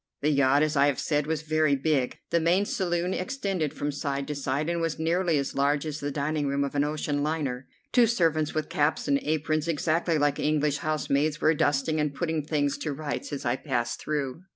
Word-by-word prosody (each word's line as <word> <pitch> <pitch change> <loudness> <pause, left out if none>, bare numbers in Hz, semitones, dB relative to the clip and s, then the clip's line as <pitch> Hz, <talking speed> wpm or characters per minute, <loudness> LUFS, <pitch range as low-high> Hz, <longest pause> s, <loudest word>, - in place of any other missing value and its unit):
The 150 - +2
yacht, 140 0 +4
as 155 0 0
I 140 0 +5
have 140 -3 +1
said, 150 -1 0
was 160 -1 -1
very 155 -2 +2
big. 135 -2 0
The 170 - +3
main 175 +5 +2
saloon 180 -2 -1
extended 185 - -2
from 145 - -3
side 140 -1 -3
to - - -1
side, 140 +1 -2
and 170 0 -1
was 165 -2 -1
nearly 165 0 +1
as 140 -1 -2
large 145 +2 +1
as 155 -1 -4
the 145 - -3
dining 145 +1 -1
room 140 0 0
of 140 - -3
an 145 0 +2
ocean 150 -1 -1
liner. 145 -4 -2 0.2
Two 245 -2 +5
servants 160 -9 +1
with 155 -1 -1
caps 155 +12 0
and 280 0 +3
aprons, 155 - -1
exactly 165 +1 +1
like 145 -1 +1
English 150 -1 +1
housemaids, 150 0 0
were 155 - +4
dusting 155 0 +1
and 150 -2 -1
putting 160 -1 -1
things 145 -2 0
to 150 - -2
rights 150 +1 -4
as 140 -2 -5
I 120 +2 +1
passed 120 -5 -2
through. 150 0 -3
150 Hz, 210 wpm, -27 LUFS, 140-160 Hz, 0.2 s, I